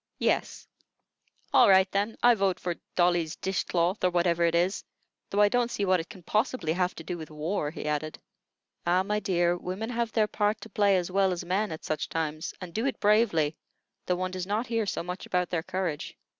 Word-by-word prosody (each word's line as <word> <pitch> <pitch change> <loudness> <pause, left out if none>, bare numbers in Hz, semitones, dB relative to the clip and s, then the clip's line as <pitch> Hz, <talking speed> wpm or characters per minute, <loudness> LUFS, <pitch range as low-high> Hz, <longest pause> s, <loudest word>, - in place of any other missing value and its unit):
"Yes." - - -1 0.9
"All 240 - +7
right, 190 0 +6
then. 205 +3 -1
I 245 0 +8
vote 195 -4 0
for 175 - -2 0.2
'Dolly's 175 -2 +2
Dish 190 0 -2
cloth,' 175 +3 0
or 180 - +5
whatever 175 -1 +2
it 170 0 +2
is; 180 +3 +1 0.5
though 205 - +2
I 205 - +7
don't 240 +2 +1
see 205 - -1
what 185 -1 +3
it 165 - -6
can 185 - -12
possibly 215 - 0
have 180 +1 0
to 160 - -8
do 175 +1 -5
with 155 - -8
war," 155 +1 -2
he 155 0 -7
added. 150 +1 -2 0.7
"Ah, 180 +2 +2
my 210 +2 -1
dear, 175 -3 +1
women 185 +6 -4
have 235 -1 -1
their 220 -1 +3
part 210 0 0
to - - -9
play 200 -3 +3
as 180 0 -2
well 195 0 +3
as 175 -1 -4
men 195 +3 0
at 160 - -7
such 155 - -2
times, 155 0 -3
and 180 -3 -8
do 225 +8 0
it 265 - -3
bravely, 205 -8 +3 0.5
though 180 - +2
one 185 +1 -2
does 185 0 -4
not 215 +4 0
hear 230 -4 -1
so 180 - -2
much 180 +2 -6
about 180 -1 0
their 170 -2 0
courage. 175 -3 -4
185 Hz, 215 wpm, -28 LUFS, 170-205 Hz, 0.9 s, I